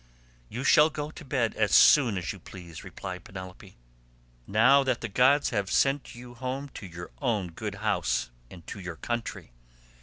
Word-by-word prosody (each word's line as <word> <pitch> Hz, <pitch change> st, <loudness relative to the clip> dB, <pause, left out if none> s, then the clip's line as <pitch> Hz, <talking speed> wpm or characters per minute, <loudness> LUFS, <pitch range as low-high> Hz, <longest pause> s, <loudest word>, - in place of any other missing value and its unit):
"You 125 Hz, -, -5 dB
shall 150 Hz, +2 st, +6 dB
go 150 Hz, 0 st, -5 dB
to 160 Hz, -, -11 dB
bed 130 Hz, -5 st, 0 dB
as 105 Hz, -2 st, 0 dB
soon 120 Hz, -9 st, +6 dB
as 90 Hz, -, -3 dB
you 100 Hz, -, -12 dB
please," 85 Hz, -3 st, -11 dB
replied 90 Hz, +1 st, -7 dB
Penelope, 95 Hz, -, -10 dB, 0.7 s
"now 125 Hz, +7 st, +5 dB
that 130 Hz, -3 st, -1 dB
the 115 Hz, -, -3 dB
gods 130 Hz, +7 st, +3 dB
have 100 Hz, -4 st, -1 dB
sent 135 Hz, -1 st, +1 dB
you 120 Hz, 0 st, -11 dB
home 130 Hz, +3 st, -5 dB
to 100 Hz, -, -9 dB
your 85 Hz, 0 st, -9 dB
own 105 Hz, -9 st, -1 dB
good 105 Hz, +4 st, -5 dB
house 90 Hz, -, 0 dB, 0.2 s
and 85 Hz, -2 st, -13 dB
to -, -, -8 dB
your 90 Hz, -3 st, -6 dB
country. 120 Hz, -, -5 dB
110 Hz, 175 wpm, -28 LUFS, 95-130 Hz, 0.7 s, shall